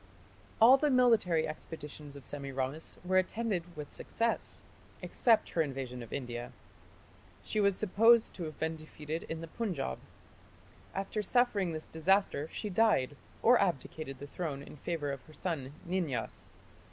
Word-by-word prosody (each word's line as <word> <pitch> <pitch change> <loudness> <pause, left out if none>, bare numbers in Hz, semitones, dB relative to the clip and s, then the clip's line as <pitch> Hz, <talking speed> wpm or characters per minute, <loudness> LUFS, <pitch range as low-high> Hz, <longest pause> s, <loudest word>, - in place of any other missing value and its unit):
All 245 +4 +9
the 295 +2 +2
military 230 - +4
expeditions 150 -2 -8
of 140 - -9
Semiramis 140 +1 -3
were 185 +1 +4
attended 185 -4 -2
with 150 -1 -6
success, 230 0 -2 0.4
except 230 -3 +3
her 165 - +2
invasion 135 -4 -3
of 115 - -9
India. 120 -3 -4 0.9
She 215 - -1
was 200 -2 +4
supposed 225 +3 +5
to 175 - -5
have 155 -1 -7
been 160 0 -1
defeated 155 0 -6
in 160 0 -4
the 165 - -6
Punjab. 165 - -3 1.0
After 195 +2 -2
suffering 210 -4 +2
this 155 0 -5
disaster 170 -2 +2
she 215 - -4
died, 190 - +3 0.3
or 240 -1 +7
abdicated 155 -5 -2
the 145 - -7
throne 145 -2 -4
in 150 - -11
favour 145 -1 -2
of 140 -2 -5
her 155 - -15
son 155 -7 -3 0.2
Ninyas. 170 -10 -2
165 Hz, 145 wpm, -32 LUFS, 145-200 Hz, 1.0 s, All